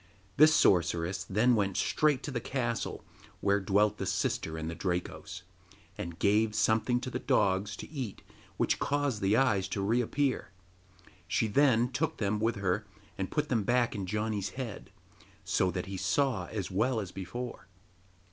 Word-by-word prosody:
This 155 +2 +7
sorceress 90 - +2
then 115 +6 +3
went 100 -4 +1
straight 150 -4 +2
to 145 - -4
the 125 - -2
castle 120 -2 -3 0.3
where 100 +1 +2
dwelt 105 +2 +2
the - - -2
sister 80 0 -1
and 80 0 -4
the 85 - -3
Drakos, 90 +1 -4 0.5
and 85 -1 -6
gave 105 +2 +2
something 110 +3 +2
to 130 - -5
the - - -2
dogs 100 0 +1
to - - -8
eat 130 -9 -5 0.3
which - - +1
caused 145 -6 0
the 100 +3 +3
eyes 105 -8 +2
to 100 - -3
reappear. 125 +5 0 0.8
She 110 - +1 0.5
took 155 +4 -1
them 105 0 0
with 115 +1 +1
her 100 +2 -1 0.3
and 95 -1 -3
put 150 0 -1
them 115 -4 +2
back 120 +3 +2
in 100 -4 -4
Janni's 105 -1 -1
head, 120 -6 -6 0.5
so 95 - +1
that 90 0 -3
he 95 0 -5
saw 125 -4 0
as 100 -5 -4
well 115 +5 +1
as 95 -4 -5
before. 120 +4 -6
105 Hz, 160 wpm, -30 LUFS, 95-125 Hz, 0.8 s, This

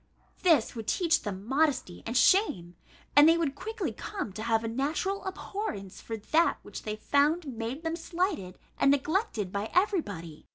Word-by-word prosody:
This 320 -11 +4
would 225 -2 -6
teach 340 -4 +2
them 200 -2 -5
modesty 270 - 0
and 235 +2 0
shame, 185 - +3 0.4
and 290 +2 +9
they 330 - +5
would 320 -5 0
quickly 445 +10 -4
come 385 - -5
to 215 - -6
have 225 0 +1
a - - -2
natural 300 - -1
abhorrence 375 - -5
for 225 - -5
that 320 +11 +2
which - - -8
they 215 -1 -4
found 290 +9 +2
made 250 +3 -5
them 325 0 -1
slighted 335 - -2 0.2
and 275 - +5
neglected 285 - 0
by 200 +2 -3
every 380 0 +3
body." 165 - -9
280 Hz, 170 wpm, -29 LUFS, 215-340 Hz, 0.4 s, and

